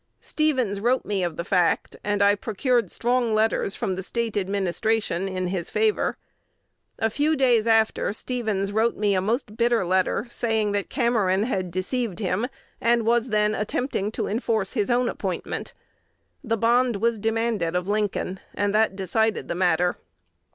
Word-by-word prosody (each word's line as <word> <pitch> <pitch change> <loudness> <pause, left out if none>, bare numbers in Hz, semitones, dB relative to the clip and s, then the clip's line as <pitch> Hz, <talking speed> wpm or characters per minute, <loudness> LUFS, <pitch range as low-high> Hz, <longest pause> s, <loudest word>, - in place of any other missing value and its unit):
Stevens 260 -10 0
wrote 245 +5 +1
me 200 -3 -1
of 170 -3 -3
the 170 - -2
fact; 180 -2 +1
and 205 0 +1
I 200 0 +6
procured 230 +4 0
strong 240 -2 +1
letters 215 -2 +1
from 200 -6 -2
the 190 - -4
State 230 +3 -3
administration 195 0 0
in 185 -1 -2
his 180 -3 -3
favor. 440 -1 +1 0.8
A 225 0 0
few 300 +6 +1
days 245 -5 +3
after 225 -2 +2
Stevens 215 -4 -2
wrote 220 +3 +1
me 205 -1 +2
a 185 - +1
most 215 +2 -2
bitter 235 -4 +2
letter, 185 +4 +1
saying 225 -3 0
that 200 -1 -2
Cameron 210 -5 +1
had 190 -6 -2
deceived 185 +3 -2
him, 200 +3 -1 0.3
and 235 -1 +2
was 235 +1 +2
then 210 -1 +2
attempting 215 -1 -2
to - - -2
enforce 220 -2 -1
his 215 -4 0
own 245 0 +2
appointment. - - -4 0.7
The 230 -3 0
bond 240 +2 +3
was 225 +2 0
demanded 225 -5 0
of 180 +1 -1
Lincoln; 205 -2 -1 0.2
and 205 0 0
that 215 -2 +2
decided 210 +4 0
the - - 0
matter." 175 0 +1
215 Hz, 160 wpm, -24 LUFS, 195-235 Hz, 0.8 s, I